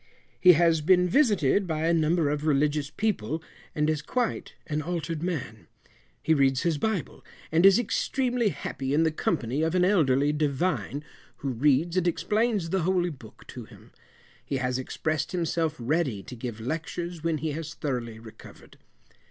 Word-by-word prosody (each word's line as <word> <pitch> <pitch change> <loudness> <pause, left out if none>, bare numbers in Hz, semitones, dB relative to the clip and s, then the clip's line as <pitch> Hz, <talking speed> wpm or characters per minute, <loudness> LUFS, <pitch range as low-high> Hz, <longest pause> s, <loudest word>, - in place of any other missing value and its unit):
He 180 -1 +8
has 165 -1 +3
been 180 +3 +4
visited 200 - +2
by 160 -1 -1
a 170 - +3
number 165 0 +2
of 150 +1 -2
religious 145 0 +1
people, 160 - -2 0.3
and 150 0 +1
is 155 -1 0
quite 245 +9 -2
an 150 0 -2
altered 165 -1 -3
man. 125 - -4 0.6
He 160 - +3
reads 135 -2 +2
his 165 -4 0
bible, 215 -4 -2 0.3
and 165 +4 +6
is 195 - +6
extremely 245 0 0
happy 140 -3 -3
in 160 - +3
the 160 - +2
company 130 -2 -1
of 160 +2 0
an 180 -1 +4
elderly 145 -7 +3
Divine, 150 0 -1 0.4
who - - +1
reads 145 +7 +2
and 180 -1 +2
explains 210 -1 0
the 190 - +1
holy 180 0 +1
book 120 -7 -14
to - - -8
him. - - -17 0.5
He 135 - -3
has 125 0 -1
expressed 155 +5 -3
himself 165 -2 -1
ready 125 - -1
to 125 - -9
give 115 -2 -6
lectures 165 +6 -4
when 165 -1 0
he 155 +1 -3
has 155 +1 -6
thoroughly 120 -6 -4
recovered. 110 -1 -14
155 Hz, 165 wpm, -27 LUFS, 140-175 Hz, 0.6 s, He